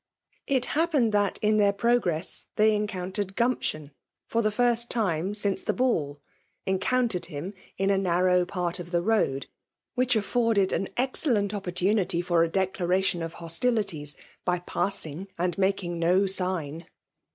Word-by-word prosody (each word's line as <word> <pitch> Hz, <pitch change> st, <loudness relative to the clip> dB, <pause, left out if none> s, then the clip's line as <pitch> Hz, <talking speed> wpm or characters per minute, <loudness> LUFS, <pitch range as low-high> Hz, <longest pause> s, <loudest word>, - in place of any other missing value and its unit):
It 260 Hz, -2 st, +2 dB
happened 300 Hz, -8 st, +2 dB
that, 205 Hz, -2 st, +1 dB
in 215 Hz, 0 st, +3 dB
their 205 Hz, -1 st, +4 dB
progress^ 200 Hz, -7 st, 0 dB
they 215 Hz, +1 st, +4 dB
enconntered 195 Hz, -1 st, -3 dB
Oumption, 175 Hz, -, -1 dB, 0.4 s
lor 230 Hz, -, +3 dB
the 215 Hz, -, +2 dB
first 235 Hz, +2 st, +2 dB
time 195 Hz, -3 st, -1 dB
since 205 Hz, -2 st, 0 dB
the -, -, -1 dB
baU; 170 Hz, -, 0 dB, 0.5 s
encountered 190 Hz, -1 st, 0 dB
him 170 Hz, +4 st, -6 dB, 0.2 s
in 195 Hz, +1 st, +1 dB
a 195 Hz, -, +2 dB
narrow 180 Hz, 0 st, +3 dB
part 180 Hz, -1 st, -3 dB
of 175 Hz, -1 st, -7 dB
the 175 Hz, -1 st, 0 dB
road, 180 Hz, -11 st, +1 dB, 0.5 s
which 250 Hz, -1 st, +2 dB
aflTorded 220 Hz, -2 st, +2 dB
an 195 Hz, -, -1 dB
excellent 245 Hz, -5 st, +1 dB
opportunity 190 Hz, -1 st, 0 dB
for 175 Hz, -1 st, +2 dB
a 165 Hz, -, 0 dB
declaration 185 Hz, -1 st, 0 dB
of 165 Hz, 0 st, -4 dB
hostilities, 170 Hz, -, -1 dB, 0.3 s
by 180 Hz, -1 st, +1 dB
passing 175 Hz, -1 st, -3 dB
and 175 Hz, 0 st, 0 dB
making 190 Hz, -3 st, 0 dB
no 180 Hz, +4 st, +3 dB
sign 180 Hz, -4 st, 0 dB
190 Hz, 140 wpm, -27 LUFS, 175-215 Hz, 0.5 s, their